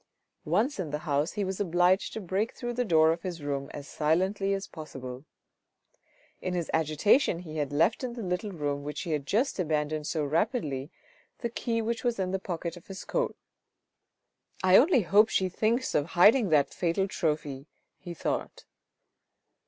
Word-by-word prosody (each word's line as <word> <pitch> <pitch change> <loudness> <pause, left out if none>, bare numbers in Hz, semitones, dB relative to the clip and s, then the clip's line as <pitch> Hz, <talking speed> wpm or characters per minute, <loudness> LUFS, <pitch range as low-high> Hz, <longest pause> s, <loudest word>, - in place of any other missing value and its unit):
Once 215 - +1
in 175 -5 -2
the 150 - -2
house 145 +1 0
he 210 - -1
was 190 0 -3
obliged 180 0 +2
to - - -5
break 195 +3 -2
through 240 -1 -4
the 245 +1 0
door 160 -6 +4
of 165 +1 -2
his 175 -5 -5
room 140 -1 -3
as 145 -1 -8
silently 190 +6 +1
as 195 0 -1
possible. 135 -4 -8 1.2
In 185 -1 -2
his 170 -2 -2
agitation 160 - +3
he 160 -3 -8
had 145 -2 -1
left 165 - +2
in 250 -2 -3
the 235 -2 -6
little 180 +3 -2
room 145 -5 -2
which 150 +1 -5
he 170 - -4
had 145 -2 -2
just 225 - +1
abandoned 155 -2 -1
so 155 -3 -1
rapidly, 150 - -1 0.5
the 235 - -2
key 230 -1 -1
which 230 +2 -2
was 240 -2 0
in 185 -1 -1
the 190 - -1
pocket 170 -2 -4
of 175 - -14
his 195 -1 -8
coat. - - -1 0.7
" - - -25
I 185 0 +6
only 275 - +6
hope 205 +5 +5
she 190 -1 +1
thinks 230 +7 0
of 145 - +1
hiding 205 +6 +5
that 145 -3 +3
fatal 180 +2 0
trophy," 150 -6 -2 0.3
he 175 -1 -8
thought. - - -3
175 Hz, 180 wpm, -28 LUFS, 155-205 Hz, 1.2 s, I